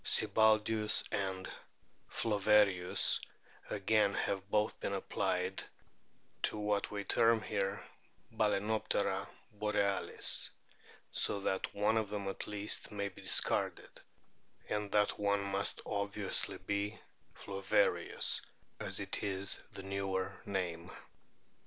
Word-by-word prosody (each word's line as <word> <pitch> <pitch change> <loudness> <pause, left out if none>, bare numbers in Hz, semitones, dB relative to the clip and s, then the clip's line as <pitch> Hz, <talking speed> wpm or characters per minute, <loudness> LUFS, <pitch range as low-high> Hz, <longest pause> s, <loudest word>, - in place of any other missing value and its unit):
Sibbaldius 110 0 +3
and 95 -1 -2 0.6
Flowerius 105 -4 +3 0.5
again 105 0 +2
have 100 0 -2
both 105 +1 +1
been - - -2
applied 90 +1 -1 0.8
to - - +1
what 105 -1 0
we 100 -1 -4
term 115 +2 +4
here 100 -2 -2 0.5
Balanoptera 110 0 0 0.3
borealis; 105 -1 +1 0.6
so 100 - +1
that 95 -1 -1
one 105 +2 +2
of 110 -2 0
them 100 -1 -4
at 95 - -4
least 105 0 0
may 100 -1 -2
be 95 - -14
discarded, - - +2 0.7
and 105 -1 -2
that 105 -1 +2
one 100 0 +1
must 100 0 -2
obviously 100 -1 0
be 100 0 -3 0.4
Flowerius, 95 -1 0 0.4
as - - -2
it - - -3
is 95 -1 +2
the 95 - -8
newer 95 0 -2
name. 90 -3 -3
100 Hz, 105 wpm, -34 LUFS, 95-105 Hz, 0.8 s, term